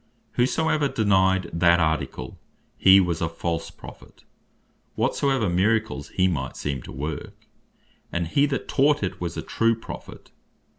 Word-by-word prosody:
Whosoever 145 Hz, +4 st, +1 dB
denyed 95 Hz, -5 st, +2 dB
that 85 Hz, 0 st, +4 dB
Article, 80 Hz, -5 st, -2 dB, 0.4 s
he 95 Hz, 0 st, +7 dB
was 85 Hz, -3 st, 0 dB
a 80 Hz, -, 0 dB
false 85 Hz, 0 st, -3 dB
Prophet, -, -, -14 dB, 0.7 s
whatsoever 135 Hz, -6 st, +1 dB
miracles 100 Hz, -3 st, 0 dB
he 95 Hz, 0 st, +2 dB
might 70 Hz, -8 st, -3 dB
seem 70 Hz, -3 st, -3 dB
to -, -, -11 dB
work; 75 Hz, +2 st, -6 dB, 0.7 s
and 85 Hz, -1 st, -2 dB
he 140 Hz, -, +2 dB
that 135 Hz, -1 st, -3 dB
taught 145 Hz, -2 st, +2 dB
it 90 Hz, -, -4 dB
was 85 Hz, -2 st, -4 dB
a -, -, -3 dB
true 115 Hz, 0 st, +1 dB
Prophet. 115 Hz, -, -10 dB
95 Hz, 140 wpm, -24 LUFS, 80-115 Hz, 0.7 s, he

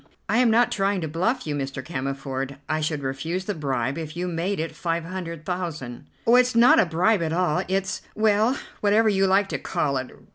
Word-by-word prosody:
"I 225 Hz, -, +1 dB
am 250 Hz, -2 st, +4 dB
not 235 Hz, +2 st, +4 dB
trying 195 Hz, 0 st, +1 dB
to 160 Hz, -, -2 dB
bluff 185 Hz, -, -1 dB
you, 150 Hz, -, -2 dB
Mr. 135 Hz, -2 st, -4 dB
Cammerford. 135 Hz, -2 st, -4 dB
I 155 Hz, 0 st, -1 dB
should 150 Hz, -2 st, -2 dB
refuse 160 Hz, +8 st, -3 dB
the 205 Hz, -, -2 dB
bribe 135 Hz, -3 st, -2 dB
if 160 Hz, 0 st, -7 dB
you 180 Hz, +1 st, -2 dB
made 175 Hz, +3 st, -2 dB
it 160 Hz, 0 st, -3 dB
five 165 Hz, 0 st, -2 dB
hundred 170 Hz, -3 st, -6 dB
thousand." 155 Hz, -8 st, -5 dB, 0.2 s
"Oh, 235 Hz, +2 st, +6 dB
it's 250 Hz, -1 st, +3 dB
not 235 Hz, +2 st, +7 dB
a 195 Hz, -, +4 dB
bribe 180 Hz, +5 st, +2 dB
at 160 Hz, -1 st, -1 dB
all, 175 Hz, -3 st, +1 dB
it's 190 Hz, 0 st, -1 dB
well, 215 Hz, +4 st, +3 dB, 0.2 s
whatever 215 Hz, +2 st, +3 dB
you 195 Hz, -1 st, +2 dB
like 195 Hz, +1 st, +3 dB
to 150 Hz, -, -2 dB
call 140 Hz, 0 st, -1 dB
it. 130 Hz, -1 st, -4 dB
170 Hz, 210 wpm, -24 LUFS, 150-200 Hz, 0.2 s, not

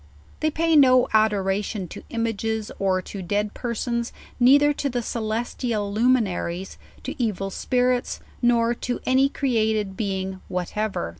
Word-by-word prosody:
They 310 Hz, -, +1 dB
pay 325 Hz, +1 st, +1 dB
no 255 Hz, -3 st, +6 dB
adoration 205 Hz, -2 st, +1 dB
to -, -, -8 dB
images 225 Hz, -1 st, -2 dB
or 185 Hz, -1 st, +1 dB
to 195 Hz, -, -7 dB
dead 205 Hz, +3 st, -1 dB
persons, 235 Hz, 0 st, -2 dB, 0.3 s
neither 285 Hz, +4 st, +6 dB
to 285 Hz, 0 st, -2 dB
the 245 Hz, -2 st, -2 dB
celestial 220 Hz, -2 st, -2 dB
luminaries, 205 Hz, -6 st, 0 dB, 0.2 s
to -, -, -4 dB
evil 195 Hz, -4 st, -1 dB
spirits, 250 Hz, +3 st, 0 dB, 0.2 s
nor 235 Hz, -1 st, +3 dB
to 245 Hz, +1 st, -3 dB
any 265 Hz, +2 st, +4 dB
created 220 Hz, -7 st, 0 dB
being 190 Hz, -2 st, -3 dB
whatever. 180 Hz, -, -2 dB
220 Hz, 130 wpm, -24 LUFS, 200-245 Hz, 0.3 s, no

